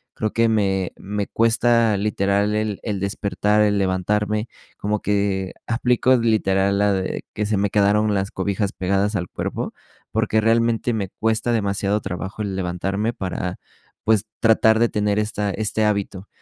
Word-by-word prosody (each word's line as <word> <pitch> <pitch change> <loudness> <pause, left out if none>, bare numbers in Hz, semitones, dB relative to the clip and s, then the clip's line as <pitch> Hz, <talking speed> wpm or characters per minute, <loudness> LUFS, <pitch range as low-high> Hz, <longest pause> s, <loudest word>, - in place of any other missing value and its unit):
Creo 110 - -2
que 115 0 +3
me 95 -4 +1
me 100 0 -4
cuesta 115 -1 +3
literal 100 0 +1
el 105 -2 -1
el 105 -3 -2
despertar, 105 +1 0
el 105 -1 +3
levantarme, 105 +4 0 0.3
como 105 0 -2
que 100 -2 0
aplico 125 +2 +2
literal 100 -4 +2
la 105 0 +3
de 95 -1 -2
que 105 - -2
''se 105 0 0
me 100 +1 +1
quedaron 105 +1 +3
las 95 0 -1
cobijas 100 0 -2
pegadas 100 +3 0
al 90 -2 -2
cuerpo", - - -4 0.4
porque 110 0 +1
realmente 115 +1 +2
me 105 -4 -2
cuesta 110 +4 -1
demasiado 100 -1 0
trabajo 95 +3 -5
el 100 -2 -3
levantarme 95 +5 -2
para, 90 -2 -4 0.4
pues, 110 -1 +2 0.2
tratar 110 0 +5
de 120 - +3
tener 105 0 0
esta 105 -1 -1
este 110 +1 -1
hábito. 100 -2 -2
105 Hz, 155 wpm, -22 LUFS, 100-110 Hz, 0.4 s, tratar